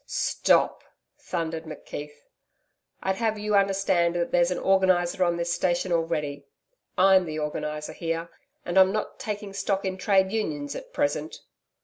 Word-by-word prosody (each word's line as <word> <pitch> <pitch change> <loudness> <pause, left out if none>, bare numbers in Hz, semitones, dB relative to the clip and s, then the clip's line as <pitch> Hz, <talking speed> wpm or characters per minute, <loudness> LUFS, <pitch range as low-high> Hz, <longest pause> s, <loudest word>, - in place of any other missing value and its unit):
'Stop,' - - +2 0.4
thundered 165 -2 -3
McKeith. 150 -1 -8 0.8
'I'd 190 0 0
have 220 -2 0
you 210 0 -2
understand 195 -3 +2
that 170 -1 -1
there's 175 0 +3
an 180 - -1
organiser 185 -2 +2
on 175 -1 +1
this 170 0 -1
station 175 0 0
already. 160 -4 -1 0.5
I'M 190 0 +6
the 155 0 -4
Organiser 150 0 -4
here, 165 0 -3 0.3
and 175 +2 +3
I'm 190 0 +6
not 215 +1 -3
taking 205 -2 -5
stock 195 0 -1
in 190 0 -3
Trades 190 0 +2
Unions 150 -10 -2
at - - -8
present.' 145 +2 -2
175 Hz, 145 wpm, -26 LUFS, 160-190 Hz, 0.8 s, I'M